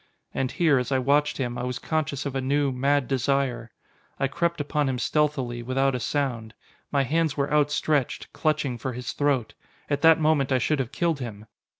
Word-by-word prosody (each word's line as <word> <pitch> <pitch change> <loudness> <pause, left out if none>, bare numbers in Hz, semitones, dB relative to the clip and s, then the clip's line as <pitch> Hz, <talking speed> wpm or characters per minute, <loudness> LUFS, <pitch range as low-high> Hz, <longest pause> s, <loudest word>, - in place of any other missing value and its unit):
And 130 -1 -1
here, 160 -7 +3
as 125 +1 -3
I 135 - +3
watched 140 +3 +2
him, 120 -2 -3
I - - -3
was 125 -1 -2
conscious 150 -1 -2
of 140 -1 -3
a 135 - 0
new, 140 +1 +1
mad 135 +1 +1
desire. 135 -2 0 0.5
I 135 - +2
crept 170 +5 -1
upon 145 -1 0
him 130 - -1
stealthily, 130 -4 0
without 135 +3 +1
a 125 - -1
sound. 115 -4 -2 0.4
My 140 -1 +2
hands 160 +2 0
were 140 +1 0
outstretched, 150 -2 +1
clutching, 150 -6 0
for 130 +1 -3
his 125 0 -5
throat. 130 -7 0 0.4
At 145 0 0
that 165 0 +6
moment 150 -4 +2
I 130 - +4
should 145 +4 0
have 125 -3 -2
killed 170 -4 0
him! 110 -4 -7
135 Hz, 195 wpm, -25 LUFS, 125-150 Hz, 0.5 s, that